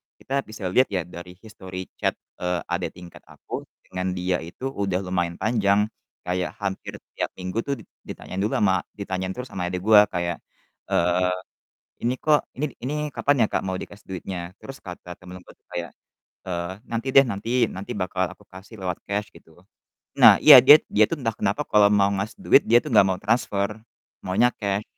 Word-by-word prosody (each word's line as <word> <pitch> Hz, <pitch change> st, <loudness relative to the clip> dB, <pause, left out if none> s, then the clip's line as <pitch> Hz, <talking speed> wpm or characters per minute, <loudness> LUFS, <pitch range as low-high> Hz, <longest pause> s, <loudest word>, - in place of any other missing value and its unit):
kita 135 Hz, +1 st, -3 dB
bisa 110 Hz, -1 st, -9 dB
lihat 130 Hz, +6 st, +4 dB
ya 95 Hz, -4 st, -2 dB
dari 90 Hz, +1 st, -11 dB
history 95 Hz, -3 st, -9 dB
chat, -, -, 0 dB, 0.2 s
eee, 90 Hz, -1 st, -1 dB
adek -, -, -2 dB
tingkat 90 Hz, -1 st, -13 dB
aku -, -, -8 dB, 0.2 s
dengan 90 Hz, 0 st, -3 dB
dia 90 Hz, 0 st, 0 dB
itu 90 Hz, +12 st, -6 dB
udah 95 Hz, -5 st, -2 dB
lumayan 90 Hz, -2 st, -1 dB
panjang. 105 Hz, -2 st, +1 dB, 0.3 s
Kayak 90 Hz, 0 st, -2 dB
hampir 95 Hz, -2 st, -4 dB, 0.2 s
tiap -, -, -2 dB
minggu 90 Hz, +4 st, -4 dB
tuh 140 Hz, -, -3 dB
dit -, -, -27 dB, 0.2 s
ditanyain 95 Hz, -, -7 dB
dulu 105 Hz, -, 0 dB
ama 95 Hz, -3 st, +2 dB, 0.2 s
ditanyain 95 Hz, -2 st, -3 dB
terus 125 Hz, 0 st, -7 dB
ama 90 Hz, -1 st, -2 dB
adik 90 Hz, 0 st, -4 dB
gua 105 Hz, 0 st, +7 dB
kayak, 85 Hz, -2 st, -2 dB, 0.5 s
eee, 90 Hz, +1 st, +2 dB, 0.7 s
"Ini 125 Hz, -, +1 dB
kok 150 Hz, -1 st, +4 dB, 0.2 s
ini 145 Hz, +4 st, -1 dB
ini 135 Hz, +5 st, -3 dB, 0.2 s
kapan 140 Hz, -2 st, +1 dB
ya, -, -, +2 dB
Kak, -, -, 0 dB
mau 95 Hz, -, -2 dB
dikasih 100 Hz, +1 st, -10 dB
duitnya?" 90 Hz, -1 st, -6 dB
Terus 135 Hz, 0 st, -9 dB
kata 90 Hz, -1 st, -9 dB
temanku 90 Hz, 0 st, -12 dB, 0.2 s
kayak, 85 Hz, 0 st, -4 dB, 0.6 s
eee, 85 Hz, -1 st, -3 dB, 0.2 s
"Nanti 115 Hz, +3 st, -2 dB
deh 135 Hz, -, +9 dB
nanti, 110 Hz, -1 st, -5 dB, 0.2 s
nanti 95 Hz, +2 st, -7 dB
bakal 95 Hz, -1 st, -1 dB
aku -, -, -21 dB
kasih 95 Hz, +4 st, -12 dB
lewat 90 Hz, -2 st, -2 dB
cash," 105 Hz, +1 st, -3 dB
gitu. 85 Hz, +1 st, -19 dB, 0.5 s
Nah, -, -, +8 dB
iya 150 Hz, -3 st, +11 dB
dia 145 Hz, +3 st, +10 dB
dia 105 Hz, -, +3 dB
tuh 165 Hz, +7 st, -4 dB
entah 115 Hz, -4 st, -2 dB
kenapa 100 Hz, +9 st, -1 dB
kalau 105 Hz, -1 st, +5 dB
mau 100 Hz, -1 st, +4 dB
ngasih 100 Hz, -, -4 dB
duit 145 Hz, -, +5 dB
dia 120 Hz, +1 st, +5 dB
tuh -, -, -6 dB
nggak 100 Hz, -, +7 dB
mau 90 Hz, -, -3 dB
transfer, 100 Hz, -2 st, 0 dB, 0.5 s
maunya 95 Hz, +7 st, +3 dB
cash. 100 Hz, 0 st, -1 dB
95 Hz, 185 wpm, -24 LUFS, 90-110 Hz, 0.7 s, iya